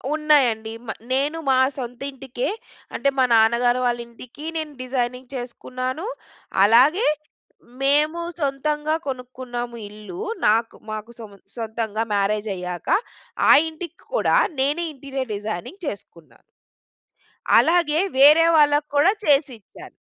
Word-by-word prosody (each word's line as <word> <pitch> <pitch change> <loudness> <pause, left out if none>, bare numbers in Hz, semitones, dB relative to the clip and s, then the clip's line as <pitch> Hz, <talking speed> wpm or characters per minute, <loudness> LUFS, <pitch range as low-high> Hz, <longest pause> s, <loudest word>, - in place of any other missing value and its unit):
ఉన్నాయండి. 255 -8 +2
మా 225 - -3 0.2
నేను 285 +4 0
మా 260 - +4 0.2
సొంత 245 -1 -6
ఇంటికే 265 -2 -4 0.5
అంటే 275 +4 +2
మా 260 - +4
నాన్నగారు 235 +2 +3
వాళ్ళ 240 -1 0
ఇంటికి, 250 +5 -12
నేను 310 -2 -4
డిజైనింగ్ 250 0 -3
చేసుకున్నాను. 255 +4 -5 0.6
అలాగే 260 - +5 0.7
మేము 300 +4 +2 0.2
సొంతంగా 295 +2 -1
కొనుక్కున్నాము 250 -2 -5
ఇల్లు. 215 - -10 0.3
నాకు 225 +2 +2 0.2
మాకు 215 +2 -6
సొం 220 -2 -9 0.2
సొంతంగా 225 -1 -3
మ్యారేజ్ 205 +1 0
అయ్యాక, 180 -1 -6 0.6
ఆ - - +10 0.2
ఇంటికి 325 +1 -9 0.2
కూడా - - +2 0.2
నేనే 295 +6 +1
ఇంటీరియర్ 270 -3 -5
డిజైనింగ్ 215 - -6
చేసుకున్న. 175 - -8 1.3
అలాగే 330 -2 +3 0.2
వేరే 300 +4 +7
వాళ్ళకి 295 -1 +4
కూడా 300 +7 +5
చేసిచ్చాను. 275 -7 -1
255 Hz, 110 wpm, -22 LUFS, 230-295 Hz, 1.3 s, ఆ